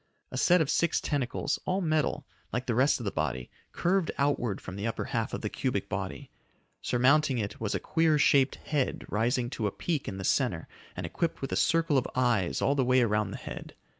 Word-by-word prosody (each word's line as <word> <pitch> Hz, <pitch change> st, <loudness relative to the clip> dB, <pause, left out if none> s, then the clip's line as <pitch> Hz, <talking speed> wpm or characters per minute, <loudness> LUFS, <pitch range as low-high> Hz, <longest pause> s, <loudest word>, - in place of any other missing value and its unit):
A 130 Hz, -, -4 dB
set 180 Hz, +4 st, +5 dB
of 150 Hz, -, 0 dB
six 170 Hz, -, +2 dB
tentacles, 135 Hz, -5 st, -1 dB
all 185 Hz, +1 st, 0 dB
metal, 155 Hz, -4 st, 0 dB, 0.3 s
like 125 Hz, +2 st, -2 dB
the 120 Hz, -, 0 dB
rest 130 Hz, +5 st, +3 dB
of -, -, -6 dB
the 100 Hz, -, -2 dB
body, 65 Hz, -5 st, -3 dB, 0.2 s
curved 185 Hz, 0 st, +1 dB
outward 125 Hz, -7 st, 0 dB
from 95 Hz, -, -8 dB
the 100 Hz, +3 st, -3 dB
upper 115 Hz, -, -2 dB
half -, -, 0 dB
of -, -, -4 dB
the -, -, -2 dB
cubic -, -, -2 dB
body. -, -, -5 dB, 0.5 s
Surmounting 135 Hz, +2 st, +3 dB
it 105 Hz, -1 st, -4 dB
was 110 Hz, -, -1 dB
a -, -, 0 dB
queer 160 Hz, -2 st, +2 dB
shaped 140 Hz, -2 st, +4 dB
head 145 Hz, -4 st, -2 dB
rising 120 Hz, +3 st, +1 dB
to 110 Hz, -6 st, -1 dB
a -, -, -2 dB
peak 155 Hz, -, -2 dB
in 95 Hz, -, -4 dB
the 95 Hz, -, -5 dB
center 95 Hz, -, +1 dB, 0.3 s
and -, -, -4 dB
equipped 165 Hz, -1 st, -2 dB
with 135 Hz, -, -4 dB
a -, -, 0 dB
circle 165 Hz, -4 st, +3 dB
of 125 Hz, -, -4 dB
eyes 120 Hz, -8 st, +1 dB
all 140 Hz, -, +3 dB
the 140 Hz, -2 st, +2 dB
way 130 Hz, +1 st, +4 dB
around 105 Hz, -3 st, +1 dB
the -, -, -6 dB
head. -, -, -8 dB
130 Hz, 215 wpm, -29 LUFS, 110-150 Hz, 0.5 s, set